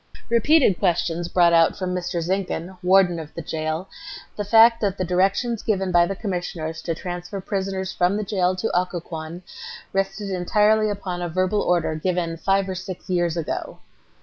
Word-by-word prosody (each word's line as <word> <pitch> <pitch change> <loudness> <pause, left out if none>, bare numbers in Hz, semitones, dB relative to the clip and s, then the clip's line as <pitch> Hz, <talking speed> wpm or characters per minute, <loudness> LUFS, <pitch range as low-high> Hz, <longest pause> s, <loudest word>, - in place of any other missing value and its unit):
Repeated 235 - +4
questions 170 -2 0
brought 175 -1 +4
out 165 -1 +4
from 185 -2 -2
Mr. 180 -1 -2
Zinkhan, 185 0 -2
Warden 180 -2 +4
of 155 -1 -8
the 170 - -4
Jail, 155 +3 -3 0.5
the 205 - -3
fact 225 +3 +6
that 200 -2 0
the 185 - -1
directions 195 +6 +1
given 195 -4 0
by 175 0 +4
the 195 - -3
Commissioners 175 -5 -4
to 165 - -3
transfer 180 +3 -6
prisoners 190 -1 -3
from 180 +3 +1
the 215 - -2
jail 185 -2 0
to 205 +2 -2
Occoquan 175 -1 -3 0.5
rested 195 +1 -2
entirely 210 +4 +2
upon 190 -3 -4
a 175 - -2
verbal 185 +4 +1
order 175 -3 +1
given 170 +1 -1
"five 195 +3 +1
or 190 - -3
six 185 0 -7
years 175 -2 +1
ago." 165 - -4
185 Hz, 170 wpm, -23 LUFS, 175-195 Hz, 0.5 s, fact